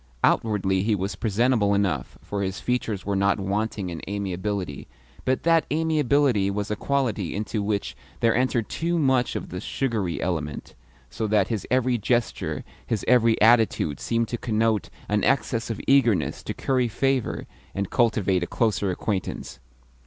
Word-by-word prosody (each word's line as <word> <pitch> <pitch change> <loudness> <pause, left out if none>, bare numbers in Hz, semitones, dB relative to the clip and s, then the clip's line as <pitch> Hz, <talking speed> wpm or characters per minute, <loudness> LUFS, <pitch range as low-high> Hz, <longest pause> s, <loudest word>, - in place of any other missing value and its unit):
Outwardly 95 -4 +2
he 105 +2 +2
was 95 0 -3
presentable 110 -1 +2
enough, 85 -11 -1
for 100 -1 -3
his 95 -1 -2
features 115 -5 -2
were 100 0 0
not 100 +1 +2
wanting 100 -1 -2
in 80 - -6
amiability, 95 -5 -3 0.4
but 130 0 +1
that 165 -1 +3
amiability 145 -9 +2
was 100 +1 -2
a - - +1
quality 115 -8 -1
into 105 +1 -2
which 100 0 -2 0.2
there 115 -1 +3
entered 125 -2 +1
too 170 +1 -1
much 130 -5 +2
of - - -4
the 90 - -5
sugary 110 -10 -2
element, 75 -5 -3 0.4
so 110 -1 -2
that 105 0 +2
his 110 -4 -3
every 125 -1 +2
gesture, 120 +2 -1 0.2
his 110 -3 -2
every 115 -2 +4
attitude, 110 - +3
seemed 115 0 0
to 120 - -3
connote 110 -2 0 0.2
an 105 -1 +1
excess 125 -4 +1
of 115 - -3
eagerness 125 -7 +3
to - - -5
curry 130 -2 +1
favour 135 +2 0 0.3
and 100 -1 -2
cultivate 105 -6 +2
a 85 - -2
closer 105 -4 0
acquaintance. 95 - -3
110 Hz, 155 wpm, -25 LUFS, 100-125 Hz, 0.4 s, every